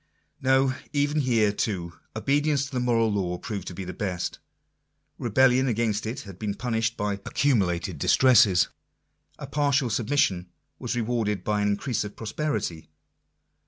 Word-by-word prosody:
No: 130 0 +3 0.2
even 145 +1 +1
here, 115 -6 +2
too, 90 -5 -3 0.2
obedience 140 +4 +1
to 140 - -10
the 130 - -1
moral 115 -3 +2
law 90 -3 -1
proved 100 -1 -6
to 90 - -6
be 95 - -5
the 90 0 -6
best. 90 -4 -3 0.8
Rebellion 130 +3 +3
against 110 -2 0
it 115 - -4
had 95 -3 -11
been 105 -2 -2
punished 115 -1 -1
by 100 -1 -2
accumulated 95 - 0
distresses: 105 - +5 0.7
a - - -7
partial 140 -3 +1
submission 105 -6 +1 0.3
was - - -3
rewarded 110 -5 -1
by 105 -1 0
an 105 - +2
increase 105 +4 -1
of 105 0 -8
prosperity. 110 - -3
110 Hz, 145 wpm, -26 LUFS, 100-130 Hz, 0.8 s, distresses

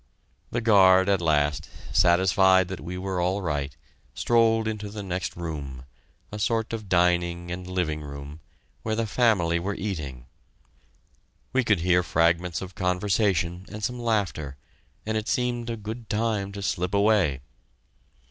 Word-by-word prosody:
The 120 - -2
guard, 95 -4 +6
at 100 -3 +2
last, 75 -1 +1 0.2
satisfied 95 +2 +4
that 95 - -5
we 90 +2 -6
were 95 -1 -2
all 95 +3 0
right, 70 -4 -3 0.4
strolled 115 -1 +2
into 105 -1 -4
the 105 0 -7
next 90 -2 -4
room 70 -7 -6 0.5
a 105 - -6
sort 115 +1 0
of 110 -3 -5
dining 85 -1 +1
and 90 +1 -6
living 90 -5 -2
room, 70 +1 -8 0.4
where 110 0 -2
the 115 0 0
family 105 -8 +2
were 100 +4 -3
eating. 75 - -5 1.3
We 130 0 +3
could 105 -7 +2
hear 90 0 +3
fragments 85 +2 +1
of 95 0 -9
conversation 95 -1 0
and 105 0 -7
some 125 +3 -2
laughter, 100 - -1 0.5
and 110 0 -1
it 110 - -3
seemed 120 -1 -1
a 115 - -3
good 110 +2 -7
time 105 -3 -1
to 100 -1 -6
slip 90 0 -1
away! 100 -10 +3
95 Hz, 150 wpm, -26 LUFS, 85-105 Hz, 1.3 s, guard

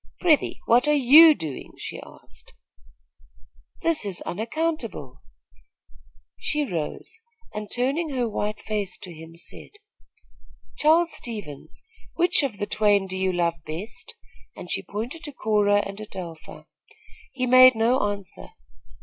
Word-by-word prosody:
"Prythee, 325 -5 +2
what 245 +5 +4
are 300 - +4
you 300 +4 +8
doing?" 155 - -7
she - - -7
asked. - - -16 1.3
"This 330 -5 +1
is 195 -4 -5
unaccountable." 230 - -4 1.2
She 300 -1 -1
rose 175 - -5 0.3
and, 210 -1 -6
turning 275 +7 0
her 245 -2 0
white 210 0 -3
face 205 -4 -3
to 180 -3 -10
him, 160 +1 -12
said: 170 - -11 1.1
"Charles 330 +3 +3
Stevens, 170 - -7 0.3
which 350 0 +3
of 265 -8 -3
the 205 - -2
twain 205 -2 +2
do 190 0 -5
you 190 0 0
love 170 -2 -1
best?" 165 +9 -6 0.4
and - - -9
she - - -1
pointed 240 +11 -6
to 295 - -6
Cora 205 -3 +2
and 200 +2 -7
Adelpha. 175 -6 -9 0.7
He 255 -1 -2
made 255 0 +8
no 235 +4 +2
answer. 200 -3 -7
215 Hz, 130 wpm, -24 LUFS, 190-275 Hz, 1.3 s, you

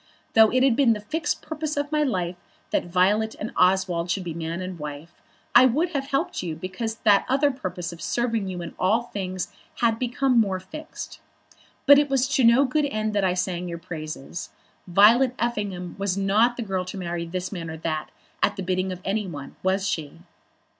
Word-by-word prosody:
Though 220 -1 +7
it 255 +1 +2
had 265 -3 +4
been 255 -3 +4
the 210 - -4
fixed 295 +9 -2
purpose 310 -1 -4
of 285 +1 -1
my 305 0 +2
life 185 -11 -1 0.4
that - - +1
Violet 200 +5 +2
and 220 - -4
Oswald 180 -2 +2
should 190 +1 -1
be 170 -2 -4
man 165 +1 -4
and 185 -2 -6
wife, 150 +2 -7 0.4
I 255 - +8
would 305 +8 +1
have 275 -5 -3
helped 295 +6 -1
you 170 -3 -4
because 195 +6 -4
that 205 -3 +4
other 280 +2 +3
purpose 180 -9 -5
of 170 - -12
serving 230 -4 -1
you 180 -2 -4
in 170 - -7
all 215 +6 +2
things 185 -5 -5 0.2
had 230 -1 +1
become 250 0 +2
more 195 -4 +1
fixed. 305 +11 -9 0.7
But 285 0 +9
it 290 -1 +1
was 270 -1 +2
to 270 - +2
no 235 +4 +6
good 295 +3 +1
end 215 -5 -2
that 205 -1 +1
I 180 -1 +2
sang 180 -1 -2
your 170 -1 -4
praises. 155 -2 -7 0.4
Violet 230 +8 +5
Effingham 205 -7 -2
was 195 -1 -1
not 215 +5 +3
the 240 - -2
girl 190 -3 -2
to 185 +2 -7
marry 170 -2 -3
this 180 +2 -4
man 170 -5 -5
or 160 - -6
that 155 -1 -3 0.3
at - - +2
the 190 - -4
bidding 185 +1 -1
of 180 -1 -6
any 205 +1 -1
one; 145 -5 -8
was 190 +1 +1
she?" 160 -1 -4
195 Hz, 200 wpm, -25 LUFS, 180-245 Hz, 0.7 s, But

